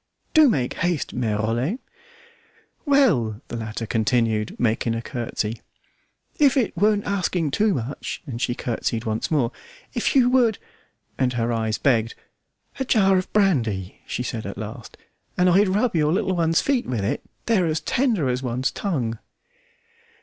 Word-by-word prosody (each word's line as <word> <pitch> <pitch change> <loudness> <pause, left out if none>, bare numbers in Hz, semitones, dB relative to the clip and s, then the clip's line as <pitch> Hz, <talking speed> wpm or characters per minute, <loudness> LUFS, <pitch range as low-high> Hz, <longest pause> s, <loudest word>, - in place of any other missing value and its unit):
"Do 310 -3 +7
make 130 - 0
haste, 170 -3 -1
Mere 110 -4 -1
Rollet!" 120 - -1 1.1
"Well," 160 - +3
the - - -5
latter 115 0 -4
continued, 110 -1 0
making 115 0 +1
a 115 - -3
curtsey, 115 -2 -3 0.8
"if 285 -3 +5
it 245 -6 +1
weren't 205 +3 +2
asking 180 -6 0
too 210 +4 +2
much," 130 +3 -5
and 120 -5 -6
she 120 - 0
curtsied 115 -2 -2
once 110 0 -2
more, 140 -7 +1 0.4
"if 240 +1 0
you 255 -3 +6
would" 240 -5 +3 0.6
and 130 -1 +2
her 120 0 0
eyes 110 -1 -1
begged 115 -4 +1 0.6
"a - - +1
jar 195 -7 +4
of 185 - -6
brandy," 115 - +1
she 125 - -3
said 115 -2 -4
at - - -7
last, - - -8 0.4
"and 180 - +4
I'd 195 +3 +5
rub 210 +3 +1
your 150 -1 +2
little 190 +1 +1
one's 165 -1 +2
feet 275 -4 0
with 110 -6 -1
it; 100 - -1 0.2
they're 200 -7 +2
as 160 0 0
tender 230 - +1
as 125 0 -1
one's 125 0 -1
tongue." 125 - -2
135 Hz, 155 wpm, -23 LUFS, -, 1.1 s, Do